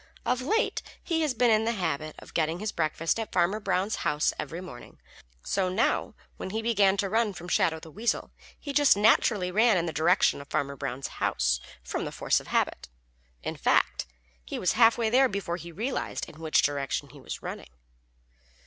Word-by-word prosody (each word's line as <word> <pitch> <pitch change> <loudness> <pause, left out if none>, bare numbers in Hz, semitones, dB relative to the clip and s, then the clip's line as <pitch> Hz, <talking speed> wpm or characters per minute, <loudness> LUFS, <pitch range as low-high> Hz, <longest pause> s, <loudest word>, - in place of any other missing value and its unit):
Of 250 0 +1
late, 440 - 0 0.2
he 330 -2 0
had 290 -6 0
been 240 0 +4
in 215 0 +4
the 230 +1 0
habit 155 -6 -2
of - - -13
getting 160 +1 0
his 210 +3 -3
breakfast 165 +4 0
at 225 - -4
Farmer 180 +4 +2
Brown's 200 +1 0
house 150 +1 +1
every 165 - -4
morning, 180 -10 -11 0.4
so 190 -2 0
now 195 +6 0 0.2
when - - -5
he 220 +3 -3
began 200 -4 +3
to 200 - 0
run 220 0 +1
from 175 -1 -9
Shadow 160 -2 +2
the 160 - -12
Weasel 225 +7 -1 0.3
he 285 - -5
just 285 -6 +5
naturally 205 -3 +3
ran 220 +1 +4
in 170 - 0
the 165 - -3
direction 165 -2 +3
of 140 - -12
Farmer 140 0 -1
Brown's 135 -1 -4
house 60 0 +1 0.2
from - - -3
force - - +1
of - - -13
habit. - - -1 0.5
In - - -3
fact, - - +1 0.4
he - - -5
was 180 - +1
halfway 225 -1 +4
there 260 +2 +5
before 190 -4 -3
he 170 -1 -9
realized 230 +10 -3
in 155 - -13
which 160 -1 +3
direction 140 -2 -1
he - - -14
was - - -7
running. - - -6
190 Hz, 190 wpm, -28 LUFS, 160-225 Hz, 0.5 s, just